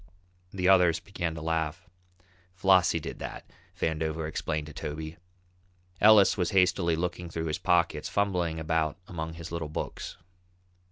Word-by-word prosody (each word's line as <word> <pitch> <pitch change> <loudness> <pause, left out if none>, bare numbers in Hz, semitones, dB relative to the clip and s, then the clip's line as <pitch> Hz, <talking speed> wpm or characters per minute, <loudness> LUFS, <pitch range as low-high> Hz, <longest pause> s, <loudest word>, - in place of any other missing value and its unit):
The 90 -1 -1
others 90 -3 +5
began 85 -2 -4
to 80 - -7
laugh. 80 0 -2 0.7
"Flossie 90 -3 +4
did - - -7
that," - - -7 0.3
Vandover 80 0 -1
explained 75 -1 -3
to 75 - -10
Toby. 80 +3 -6 0.8
Ellis 105 -2 +7
was 90 -3 +1
hastily 90 -3 +3
looking 85 +1 -3
through 80 0 -4
his 75 -1 -2
pockets, 85 -3 +1
fumbling 90 -5 0
about 80 -1 0
among 80 -2 -5
his 85 0 -8
little 85 -2 -3
books. 75 - -5
85 Hz, 135 wpm, -28 LUFS, 80-90 Hz, 0.8 s, Ellis